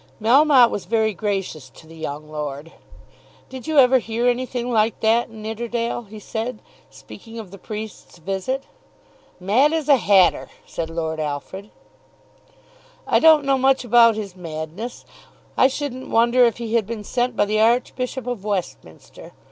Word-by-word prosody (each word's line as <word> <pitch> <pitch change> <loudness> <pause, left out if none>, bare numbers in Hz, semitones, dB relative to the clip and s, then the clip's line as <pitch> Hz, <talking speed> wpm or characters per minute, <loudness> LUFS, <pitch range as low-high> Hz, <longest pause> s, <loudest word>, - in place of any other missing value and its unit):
Melmotte 255 +2 +5
was 200 - -4
very 220 -1 +1
gracious 190 -8 -4
to 145 - -17
the 165 +1 -14
young 155 -1 -6
lord. 150 +1 -6 0.8
"Did 260 +2 -9
you 315 -1 -1
ever 260 -1 +6
hear 230 +1 -2
anything 245 0 -1
like 220 -1 +1
that, 230 +2 +2
Nidderdale?" 230 +2 -4
he 215 - -10
said, 225 +2 -5 0.3
speaking 225 0 -13
of 215 -5 -8
the 200 - -12
priest's 215 -2 -8
visit. 195 +10 -3 0.8
"Mad 240 - +2
as 320 -3 -1
a 285 -2 +6
hatter," 190 -4 +3 0.2
said 165 -1 -5
Lord 160 -1 -3
Alfred. 155 +7 -5 1.4
"I - - +3
don't 315 -3 +6
know 270 -1 +2
much 265 0 +2
about 230 -1 +5
his 200 -4 -6
madness. 165 +6 -7 0.5
I 260 - +5
shouldn't 265 -2 -5
wonder 240 +2 +4
if 235 - 0
he 230 -2 -5
had 225 -4 +1
been 225 -2 -5
sent 245 +3 -1
by 205 - +2
the 215 +1 0
Archbishop 250 +2 0
of 245 -5 -4
Westminster. 170 - -6
225 Hz, 155 wpm, -21 LUFS, 190-250 Hz, 1.4 s, ever